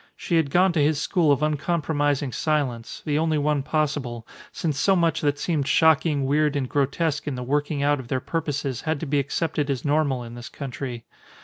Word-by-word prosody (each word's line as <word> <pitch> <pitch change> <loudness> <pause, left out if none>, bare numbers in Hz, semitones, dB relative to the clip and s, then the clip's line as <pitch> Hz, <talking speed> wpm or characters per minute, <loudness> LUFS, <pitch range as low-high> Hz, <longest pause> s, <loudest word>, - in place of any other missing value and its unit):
She 170 - -1
had 160 -4 +2
gone 180 +4 +3
to 160 - +2
his 145 0 +2
school 160 -1 +2
of 145 +1 +2
uncompromising 145 -2 0
silence, 130 -6 -2
the 150 0 +1
only 160 -1 +1
one 150 -1 +1
possible, 140 -6 -2 0.3
since 150 -4 -2
so 195 +5 +4
much 165 -2 +1
that 145 -2 +1
seemed 150 -4 -1
shocking, 155 -3 +3
weird, 150 +1 +2
and 135 -2 -1
grotesque 145 +3 0
in 140 - -2
the 125 - -4
working 145 +2 -1
out 145 0 +2
of 130 - -8
their 130 - -1
purposes 145 -4 -3
had 155 -2 -1
to - - -2
be 145 0 +1
accepted 145 +1 -1
as 135 -1 -2
normal 145 -4 +1
in 115 0 -9
this 120 0 -8
country. 125 -4 -6
145 Hz, 200 wpm, -24 LUFS, 135-155 Hz, 0.3 s, so